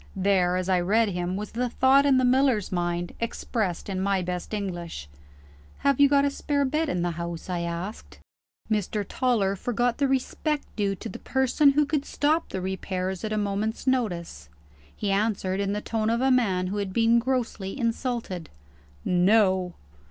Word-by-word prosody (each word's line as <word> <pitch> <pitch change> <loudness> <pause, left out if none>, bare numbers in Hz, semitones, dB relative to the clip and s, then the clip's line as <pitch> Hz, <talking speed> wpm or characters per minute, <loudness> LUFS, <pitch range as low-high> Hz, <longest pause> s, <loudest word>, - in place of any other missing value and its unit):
There, 185 -2 +2
as 185 0 -2
I 185 -1 +3
read 210 +5 +2
him, 180 0 -2
was 210 0 -5
the 245 +2 -1
thought 270 +3 +4
in 270 -2 +5
the 255 - +3
miller's 255 -5 +2
mind, 175 -1 -2
expressed 220 -5 -2
in 190 -2 -2
my 195 -1 +1
best 180 0 -4
English. 175 - -4 0.8
"Have 280 -1 +3
you 285 -1 +7
got 280 0 +4
a 285 - +1
spare 285 0 0
bed 305 +3 0
in 175 -7 -1
the 175 - 0
house?" 170 +1 -5
I 175 - -1
asked. 170 +5 -5 0.5
Mr. 210 -1 -1
Toller 220 -7 +1
forgot 240 +4 -1
the 280 - +3
respect 275 +3 -1
due 200 -2 0
to - - -7
the - - -8
person 265 +2 +3
who 300 +1 +3
could 285 -1 -1
stop 310 +3 0
the 190 - -4
repairs 190 0 -3
at 215 - -3
a 215 - 0
moment's 210 +3 -2
notice. 180 - -1 0.5
He 205 - -2
answered 195 -2 0
in 200 0 0
the 210 - -2
tone 220 0 -1
of 230 +1 +1
a 265 +1 +3
man 195 -8 +2
who 195 +3 -3
had 200 -2 -3
been 230 +1 +4
grossly 240 -4 -2
insulted: 230 - -2 0.6
"No!" 185 -1 +3
210 Hz, 180 wpm, -26 LUFS, 185-255 Hz, 0.8 s, you